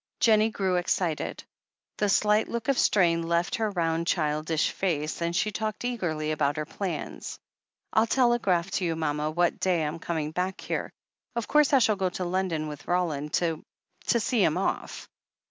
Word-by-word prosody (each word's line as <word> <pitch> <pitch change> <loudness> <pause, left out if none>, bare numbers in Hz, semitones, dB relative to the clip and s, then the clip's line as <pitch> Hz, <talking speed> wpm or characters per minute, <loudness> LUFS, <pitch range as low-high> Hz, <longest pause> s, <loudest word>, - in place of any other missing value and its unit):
Jennie 220 -1 +4
grew 190 -4 0
excited; 175 -2 -1 0.6
the 210 - +2
slight 210 +2 +3
look 235 +2 -4
of 275 - +2
strain 170 -4 +3
left 170 +1 0
her 220 -2 0
round, 170 -3 -1
childish 155 -1 +1
face, 160 -4 -2
and 170 0 -1
she 210 +3 +1
talked 215 +2 -3
eagerly 160 -11 -2
about 145 -2 +1
her 155 - -2
plans. 190 +3 -5 0.6
"I'll 220 +1 +4
telegraph 225 -8 +2
to 185 - 0
you, 165 -1 0
mama, 150 -1 -1
what 175 +2 +1
day 180 -4 +1
I'm 155 +3 -4
coming 160 -3 -2
back 180 +3 -2
here. - - -3 0.4
Of 235 -2 -2
course, 300 -1 +4
I 275 - +6
shall 220 -5 +3
go 190 -1 +1
to 180 0 -4
London 175 -4 -1
with 150 -1 -8
Roland 160 -5 -1
to— 165 -3 0 0.4
to 235 - +3
see 225 -1 +1
him 160 0 +2
off." 190 - -3
175 Hz, 175 wpm, -27 LUFS, 160-210 Hz, 0.6 s, I